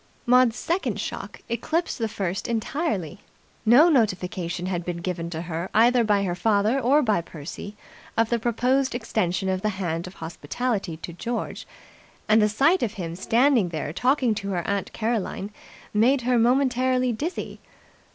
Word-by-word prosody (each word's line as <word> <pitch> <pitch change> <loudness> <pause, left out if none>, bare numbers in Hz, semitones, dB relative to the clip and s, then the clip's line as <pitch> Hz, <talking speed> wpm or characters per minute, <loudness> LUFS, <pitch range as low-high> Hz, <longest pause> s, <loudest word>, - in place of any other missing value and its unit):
Maud's 250 -2 +5
second 345 +3 -1
shock - - -6
eclipsed 310 +9 -1
the 225 - 0
first 195 -3 -3
entirely. 220 - -2 0.5
No 260 +9 +8
notification 185 - 0
had 180 -2 -2
been 175 0 -4
given 170 -1 -4
to 165 -1 -5
her 170 +1 -4
either 240 +2 +5
by 205 -2 +2
her 180 -3 -1
father 210 +6 +2
or 275 +4 +3
by 215 -7 +2
Percy 170 +6 -9 0.4
of 225 0 +3
the 235 - +2
proposed 250 +3 +1
extension 195 -5 -1
of 185 -1 0
the 215 - +1
hand 170 -2 -2
of 180 - -11
hospitality 175 +3 -3
to 170 +1 -8
George, 235 +8 -4 0.6
and 215 +1 +5
the 210 - +3
sight 300 - +3
of 230 -3 -1
him 170 -5 -5
standing 230 +1 +3
there 155 -2 -4
talking 250 - +2
to 200 -2 -4
her 175 -3 -2
aunt 200 -1 -1
Caroline 215 -2 -2 0.4
made 250 +6 +3
her 245 0 +2
momentarily 255 0 +2
dizzy. 315 +11 -4
215 Hz, 160 wpm, -25 LUFS, 180-250 Hz, 0.6 s, No